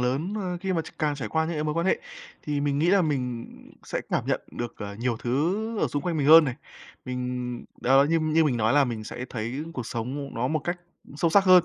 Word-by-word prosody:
lớn, 135 +11 0
ơ, 185 -4 -2
khi 190 -1 -1
mà 165 -3 0
tr - - -10
càng 150 -2 +1
trải 120 -6 -4
qua 160 0 +1
những 170 - -3
cái 150 0 -1
mối 150 - -1
quan 170 +2 0
hệ - - +3 0.4
thì 145 -1 -1
mình 145 0 0
nghĩ 160 - +2
là 195 -1 +5
mình 125 -6 -1 0.4
sẽ - - -3
cảm - - 0
nhận - - +1
được, 120 -1 -5
ờ, 100 -1 -5
nhiều 120 +2 -1
thứ 180 - -1
ở - - +2
xung 145 - -2
quanh 170 0 -1
mình 145 -2 +1
hơn 160 +1 +10
này. 130 - -2 0.5
Mình 125 -1 -4 0.2
đó, 135 +2 +5
như 165 +1 +3
như 155 +1 +3
mình 130 -5 +1
nói 110 0 +2
là 145 0 +5
mình 115 -4 -4
sẽ 125 - -6
thấy 120 +6 -3
cuộc 125 -7 -5
sống 130 +5 -4
nó 125 +2 0
một 155 +2 +1
cách 175 0 -2 0.4
sâu 165 +2 +2
sắc 195 +3 +5
hơn 185 -2 +7
145 Hz, 255 wpm, -26 LUFS, 125-165 Hz, 0.5 s, hơn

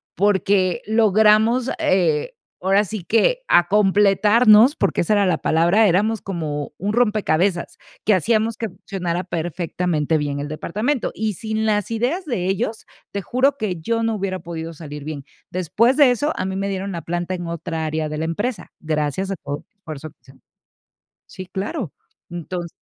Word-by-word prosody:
porque 190 -1 +2
logramos, 220 +3 +4
eh, 165 -6 +1 0.3
ahora 195 +3 +3
sí 205 -1 -6
que 230 - +2
a 175 0 +5
completarnos, 210 - +5
porque 195 - +1
esa 175 - -1
era 205 -1 +3
la 180 -4 +2
palabra, 175 +7 +3
éramos 210 +4 +1
como 155 -6 -4
un 205 +3 -2
rompecabezas, 200 -6 +1 0.3
que 215 - +4
hacíamos 220 +4 +1
que 225 -1 -4
funcionara 180 -2 -4
perfectamente 170 -2 -1
bien 145 -1 -2
el 145 - -4
departamento. 215 - -2
Y 215 -1 -2
sin 220 +3 -3
las 210 -1 0
ideas 250 - -1
de 235 - -2
ellos, 210 +3 -2 0.3
te 200 - -3
juro 260 +7 +1
que 210 -8 -2
yo 230 +7 -1
no 225 -1 0
hubiera 190 -2 -3
podido 165 -1 -6
salir 150 -2 -9
bien. 145 -2 -6 0.2
Después 210 - +1
de 280 -4 +6
eso, 290 +6 0
a 185 - -2
mí 190 - -3
me 195 +1 -2
dieron 195 0 -3
la 170 - -4
planta 175 +2 -3
en 175 -1 -6
otra 165 -1 -4
área 155 0 -2
de 150 0 -5
la 160 - -2
empresa, 205 +9 -3
gracias 155 +4 -2
a 195 - -1
todo 145 0 -3
el 215 - -52
esfuerzo 155 -5 -8
que - - -31
hicimos. 135 0 -20 0.9
Sí, 185 - -9
claro, 195 - -4 0.4
entonces 175 0 -5
190 Hz, 170 wpm, -21 LUFS, 170-220 Hz, 0.9 s, de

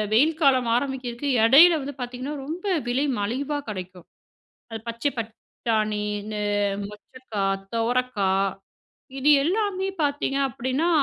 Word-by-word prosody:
வெயில் 305 +6 +4
காலம் 260 -5 +4
ஆரம்பிக்கிறதுக்கு 260 0 -3 0.2
இடையில 315 +7 +7
வந்து 280 0 -6
பார்த்தீங்கன்னா, 255 +4 -5
ரொம்ப 335 +7 -6 0.2
விலை 265 +4 +1
மலிவா 265 +8 -2
கிடைக்கும். 185 -2 -8 0.7
அது 225 - -4
பச்சைப்பட்டாணி, 225 -3 -2 0.2
இந்த 215 0 -5 0.5
மொச்சைக்கா, 210 0 -6 0.3
துவரைக்கா 230 -4 0 0.9
இது 295 +3 +4
எல்லாமே 385 +1 0
பார்த்தீங்க 285 -1 0
அப்பிடின்னா, 260 +6 -1
255 Hz, 105 wpm, -24 LUFS, 225-290 Hz, 0.9 s, இடையில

